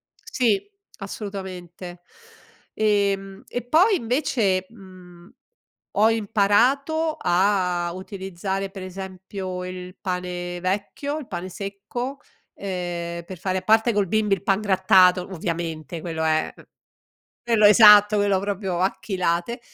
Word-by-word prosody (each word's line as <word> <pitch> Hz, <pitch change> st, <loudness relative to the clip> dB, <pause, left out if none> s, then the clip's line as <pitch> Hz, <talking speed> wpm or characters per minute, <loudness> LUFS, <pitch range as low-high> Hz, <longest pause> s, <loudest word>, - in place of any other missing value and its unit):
sì, 230 Hz, -7 st, 0 dB, 0.4 s
assolutamente. 185 Hz, -4 st, -7 dB, 0.7 s
Ehm, 200 Hz, -2 st, 0 dB
e 245 Hz, -, -4 dB
poi, 350 Hz, -, +4 dB
invece, 230 Hz, -, 0 dB
mhmm, 185 Hz, -4 st, -15 dB, 0.7 s
ho 215 Hz, +2 st, +5 dB
imparato 250 Hz, +9 st, +2 dB
a 180 Hz, -2 st, +1 dB
utilizzare, 190 Hz, +1 st, -5 dB
per 195 Hz, -1 st, -9 dB
esempio, 185 Hz, 0 st, -6 dB
il 180 Hz, 0 st, -8 dB
pane 180 Hz, -1 st, -4 dB
vecchio, 205 Hz, -, -2 dB
il 285 Hz, -, -9 dB
pane 180 Hz, +1 st, -5 dB
secco, 205 Hz, +8 st, -6 dB, 0.4 s
ehm, 175 Hz, -3 st, -4 dB
per 185 Hz, +1 st, -9 dB
fare 185 Hz, +1 st, -1 dB
a -, -, -14 dB
parte 220 Hz, +2 st, +3 dB
col 205 Hz, -2 st, +1 dB
bimby 210 Hz, +1 st, +1 dB
il 190 Hz, -, -12 dB
pan 195 Hz, 0 st, +2 dB
grattato, 185 Hz, -2 st, +4 dB
ovviamente, 165 Hz, -2 st, -4 dB
quello 160 Hz, -2 st, -4 dB
è, 155 Hz, 0 st, +1 dB
mhmm, -, -, -15 dB, 0.8 s
quello 230 Hz, -3 st, +2 dB
esatto, 210 Hz, 0 st, +8 dB
quello 200 Hz, -1 st, +2 dB
proprio 195 Hz, -3 st, -3 dB
a 190 Hz, +1 st, +1 dB
chilate, 185 Hz, +4 st, -1 dB
195 Hz, 120 wpm, -23 LUFS, 180-210 Hz, 0.8 s, esatto